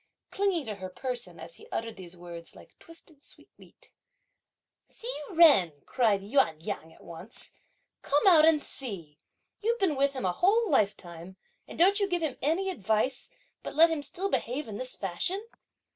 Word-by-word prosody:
clinging 385 -6 0
to 215 - -4
her 185 0 -7
person, 245 +5 -5
as - - -10
he 445 - -15
uttered 230 0 -3
these 180 -2 -11
words, 170 -1 -10
like - - -16
twisted 320 -3 -16
sweetmeat. - - -18 1.0
"Hsi 460 - -8 0.3
Jen!" 285 - +6
cried 220 -6 +2
Yüan 205 - +2
Yang 160 -6 -5
at - - -19
once, 175 +7 -11 0.5
"come 290 +5 +1
out 340 -5 +7
and 320 -1 +5
see! 175 - -8 0.4
You've 465 +2 +1
been 375 -9 +1
with 275 +1 +2
him 260 -7 -4
a 180 - +1
whole 430 - +3
lifetime, 190 - -1 0.3
and - - -10
don't 385 +5 +5
you 400 - +1
give 350 -2 -1
him 295 -5 -2
any 360 +7 0
advice; 220 - -1 0.3
but - - -7
let 330 +2 +6
him 320 -2 -1
still 385 +7 -3
behave 260 +4 -2
in 205 -2 -6
this 255 0 -1
fashion!" 355 - -3
270 Hz, 170 wpm, -29 LUFS, -, 1.0 s, out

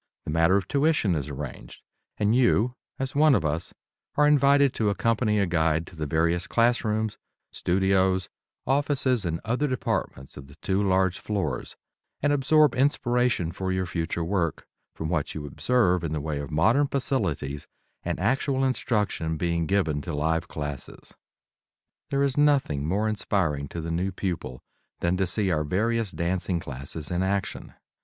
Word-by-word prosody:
The - - -3
matter 80 +4 +4
of 95 - -2
tuition 145 - +2
is 75 -3 -2
arranged, 70 -2 -8 0.3
and 105 +2 +2
you, 125 -1 +3 0.2
as 135 0 -3
one 150 -1 +5
of 95 - 0
us, 80 +3 -2 0.4
are 150 - +4
invited 140 -2 +4
to 110 -2 +1
accompany 110 +1 +1
a 100 - +3
guide 80 -2 +1
to 85 - -14
the 75 -2 -3
various 85 +3 +1
classrooms, 110 -2 +1 0.3
studios, 95 0 +1 0.4
offices 135 -5 +1
and 85 -1 -1
other 125 +6 0
departments 90 - -3
of 70 -1 -10
the 70 - -15
two 95 +1 -1
large 95 -2 +2
floors 95 -12 -3 0.4
and 145 +1 +2
absorb 150 0 +4
inspiration 125 - +1
for 95 +1 -3
your 95 0 0
future 85 -1 -2
work 85 -3 -1 0.3
from 80 - -4
what 80 -3 -2
you 75 -2 -5
observe 90 - +1
in 80 -2 -2
the 75 - -1
way 75 0 -3
of 70 - -5
modern 110 - +3
facilities 80 - -2 0.3
and - - -3
actual 135 +1 +1
instruction 105 -10 -1
being 85 -1 0
given 80 -7 +1
to 85 0 -5
live 80 +2 0
classes. 75 -3 -7 1.0
There 140 0 +1
is 135 -2 0
nothing 135 - +2
more 100 +6 +1
inspiring 90 -9 -1
to 85 - -6
the 85 +1 -4
new 90 +4 -1
pupil 85 -10 -4 0.4
than 85 +1 +1
to 95 -1 +1
see 95 +1 +1
our 75 -2 +1
various 110 +7 0
dancing 90 0 -1
classes 70 +2 -7
in 90 +1 0
action. 95 0 -2
95 Hz, 160 wpm, -26 LUFS, 80-120 Hz, 1.0 s, one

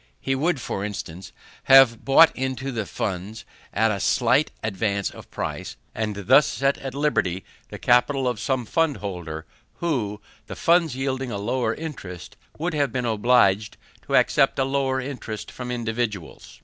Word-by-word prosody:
He 135 - -1
would, 150 +3 0
for 100 -4 -4
instance, 95 -3 -6 0.3
have 135 -4 +6
bought 160 +4 +6
into 130 +1 -3
the 110 -5 -3
funds, 100 +2 -4 0.3
at 110 +1 +2
a 100 - -2
slight 125 +8 +2
advance 100 -1 -1
of - - -13
price; - - -5 0.2
and 110 -2 -2
thus 145 - +6
set 135 +1 0
at 135 -1 -6
liberty 95 -11 0 0.2
the - - -7
capital 125 +2 +2
of 120 -4 -1
some 130 -1 -1
fundholder, 100 - -2 0.3
who, 120 -12 -2 0.3
the - - -7
funds 170 -4 +2
yielding 130 -1 -2
a 105 - -3
lower 115 +2 -1
interest, 110 - -8 0.2
would 165 +2 -2
have 145 -2 0
been 125 -2 -2
obliged 110 -2 +2 0.3
to - - +1
accept - - +3
a 135 - +2
lower 135 -1 0
interest 125 -5 -6
from 125 -1 -7
individuals. 115 -6 -4
125 Hz, 155 wpm, -24 LUFS, 105-135 Hz, 0.3 s, have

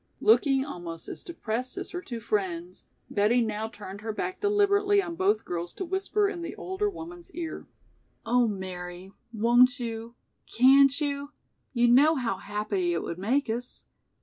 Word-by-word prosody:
Looking 275 -11 +4
almost 170 - -7
as - - -7
depressed 250 -6 -4
as - - -4
her 355 - -4
two 240 -9 -6
friends, 185 -5 -3 0.3
Betty 215 +4 +3
now 220 -1 -1
turned 205 -2 -9
her 220 +1 -3
back 370 - -4
deliberately 410 0 +3
on 360 -4 -2
both 390 +5 +1
girls 175 0 -4
to 380 - -5
whisper 390 +3 0
in 380 -4 -4
the 335 -1 -5
older 380 +3 -2
woman's 345 -1 -9
ear. 330 -2 -5 0.6
"Oh, 240 +1 +3
Mary, 185 -2 -6 0.2
won't 240 +3 +4
you, 230 0 -5 0.4
can't 275 +3 +6
you; 285 -1 -3 0.4
you 240 -2 +3
know 285 +7 +6
how 245 -4 -1
happy 205 -4 -2
it 170 - -1
would 170 - -5
make 255 +9 +1
us." 240 +2 -4
245 Hz, 160 wpm, -27 LUFS, 210-335 Hz, 0.6 s, can't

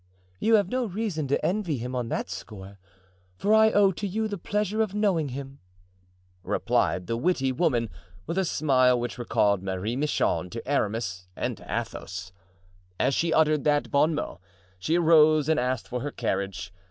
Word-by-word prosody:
"You 225 0 +4
have 200 -4 +2
no 255 -1 0
reason 190 -7 -3
to 140 - 0
envy 180 -6 0
him 125 +2 -5
on 120 -2 -2
that - - -2
score, 100 -2 -9 0.6
for 205 +2 +2
I 220 0 +6
owe 205 -2 +4
to 200 +3 -4
you 220 +3 -1
the 205 -3 -5
pleasure 210 +3 -1
of 210 -2 -1
knowing 190 -8 +1
him," 135 +1 -7 0.8
replied 90 0 0
the 115 - -2
witty 135 0 +1
woman, 125 -5 +1 0.4
with 175 - -2
a - - +2
smile 130 -6 +3
which 120 +1 -4
recalled 100 -4 +1
Marie 95 +4 -3
Michon 135 -9 0
to 115 +6 -7
Aramis 105 -8 -1
and - - -2
to - - -14 0.2
Athos. 90 +1 -8 0.7
As 140 - +2
she 165 +3 +1
uttered 155 -2 +3
that 145 -1 +1
bon 150 +3 +3
mot, 150 - -4 0.4
she 160 - +1
arose 155 -3 +5
and 160 - +2
asked 125 -1 -1
for 125 0 -4
her 145 - -3
carriage. 95 -6 -3
145 Hz, 175 wpm, -26 LUFS, 115-180 Hz, 0.8 s, I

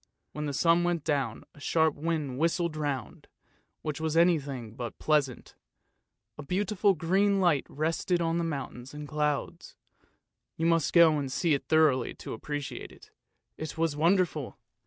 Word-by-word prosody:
When 150 0 -4
the - - -2
sun 165 +4 +3
went 175 -3 0
down, 140 -8 -1
a - - -17
sharp 160 +1 +2
wind 150 -4 -2
whistled 170 0 +1
round, 145 -6 -4 0.6
which 155 0 -3
was 160 0 0
anything 140 -10 +1
but 120 0 -6
pleasant, 145 -5 0 0.8
but - - -8
a - - -11
beautiful 200 +2 +1
green 195 +5 +2
light 170 -7 +2
rested 165 +4 0
on 170 0 0
mountains 135 -2 -6
and 150 0 -7
clouds 150 -1 -2 0.4
— - - -56
you 165 - -1
must 165 -2 +2
go 165 -3 +6
and 135 -2 -4
see 165 +3 +1
it 140 - -2
thoroughly 155 -6 +3
to - - -7
appreciate 145 +4 -5
it. - - -17 0.5
It 155 0 -6
was 165 -2 0
wonderful! 165 -3 +1
155 Hz, 155 wpm, -29 LUFS, 145-170 Hz, 0.8 s, go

